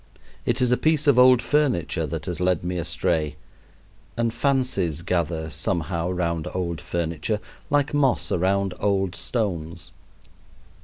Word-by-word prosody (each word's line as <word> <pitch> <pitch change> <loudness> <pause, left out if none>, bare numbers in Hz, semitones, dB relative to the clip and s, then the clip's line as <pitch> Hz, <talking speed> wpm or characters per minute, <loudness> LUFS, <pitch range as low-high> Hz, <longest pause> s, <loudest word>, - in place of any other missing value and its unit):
It 130 - +3
is 125 - +2
a 125 - +4
piece 155 -1 +2
of 140 -4 +5
old 125 -1 +7
furniture 115 - +1
that 80 -1 -4
has 90 -2 -4
led 90 -2 +1
me 90 0 -2
astray, 80 -3 0 0.8
and 115 -1 0
fancies 120 - 0
gather, 80 -3 -1
somehow, 85 +2 -1
round 85 -3 -1
old 85 -4 -2
furniture, 85 +6 -2 0.3
like 145 -1 +1
moss 140 -4 +2
around 95 +2 +1
old 95 -2 +1
stones. 85 -7 -3
90 Hz, 135 wpm, -24 LUFS, 85-120 Hz, 0.8 s, old